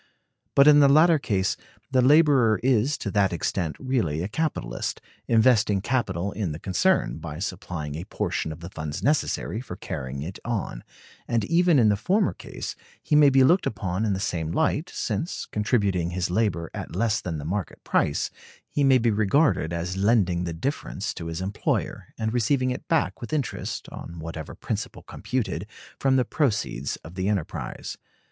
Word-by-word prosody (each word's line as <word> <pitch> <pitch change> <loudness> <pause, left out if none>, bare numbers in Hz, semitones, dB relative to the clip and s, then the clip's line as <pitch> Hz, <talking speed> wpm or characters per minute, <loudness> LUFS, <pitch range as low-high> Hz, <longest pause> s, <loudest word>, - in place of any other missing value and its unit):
But 140 +1 +7
in 150 -1 +8
the 140 - +7
latter 155 +3 +6
case 100 -7 0 0.4
the 130 -1 +4
laborer 135 -5 +5
is 130 +2 +2
to 100 - -4
that 100 -1 +2
extent 85 -1 -2
really 100 - 0
a - - -1
capitalist, 110 - -2 0.3
investing 110 -3 +4
capital 100 -4 -1
in 95 -8 -3
the 75 - -7
concern, 140 - +1
by 75 -2 -6
supplying 85 -4 -4
a 80 +3 -5
portion 80 - -2
of 80 +2 -9
the 85 - -7
funds 80 +2 -5
necessary 140 -5 0
for 105 -8 -7
carrying 70 -8 -5
it 90 +4 -7
on; 105 - -3 0.4
and 115 -3 +1
even 170 -1 +4
in 115 -4 +5
the 105 - +3
former 190 - +1
case - - -7 0.2
he 150 - 0
may 150 -1 +7
be 135 -1 +5
looked 175 +8 +4
upon 95 -2 -2
in 105 -3 +1
the 95 - -2
same 85 -5 -2
light, 160 - 0
since, 170 - -3
contributing 100 -5 0
his 90 0 -2
labor 90 -5 0
at - - -6
less 110 +2 +1
than 85 -3 -4
the 75 - -6
market 95 +4 -4
price, 70 - +1 0.4
he 145 - 0
may 135 -1 +6
be 115 -1 +2
regarded 105 - +2
as 85 +2 -3
lending 95 -4 +2
the 85 - -3
difference 80 - -3
to 85 - -6
his 85 +2 -4
employer, 95 +2 -2
and 110 0 -1
receiving 130 +2 +2
it 125 - -6
back 140 - 0
with 120 - -7
interest 145 -5 -3
(on 85 - -9
whatever 80 -1 -7
principle - - -4
computed) 110 -7 -3 0.3
from 135 -1 +3
the 130 -2 +3
proceeds 110 - -1
of 80 - -10
the 95 +1 -2
enterprise. 100 -6 -3
105 Hz, 175 wpm, -25 LUFS, 85-130 Hz, 0.4 s, in